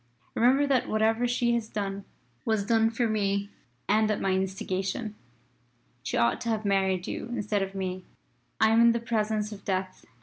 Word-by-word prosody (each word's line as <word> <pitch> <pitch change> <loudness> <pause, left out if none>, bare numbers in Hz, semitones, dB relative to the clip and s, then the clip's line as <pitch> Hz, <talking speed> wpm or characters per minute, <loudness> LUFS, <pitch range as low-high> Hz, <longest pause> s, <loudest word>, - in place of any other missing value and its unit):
Remember 260 +5 +4
that 270 -3 +1
whatever 225 +2 +2
she 240 0 +1
has 230 -2 -1
done 200 -1 -4 0.4
was 220 -3 0
done 225 0 +3
for 230 +1 0
me 200 -2 0 0.4
and 215 +1 +3
at 215 - 0
my 195 - 0
instigation. 190 +2 -2 0.9
She - - -3
ought 115 0 +2
to 235 - -3
have 220 -1 -1
married 190 -2 +1
you - - -5
instead 210 -4 -1
of 195 0 -4
me. 185 -1 -3 0.6
"I 220 0 +5
am 225 +1 +5
in 235 0 +6
the 235 - -1
presence 215 -2 -1
of 200 -2 -9
Death. 185 -1 -3
215 Hz, 175 wpm, -28 LUFS, 195-230 Hz, 0.9 s, in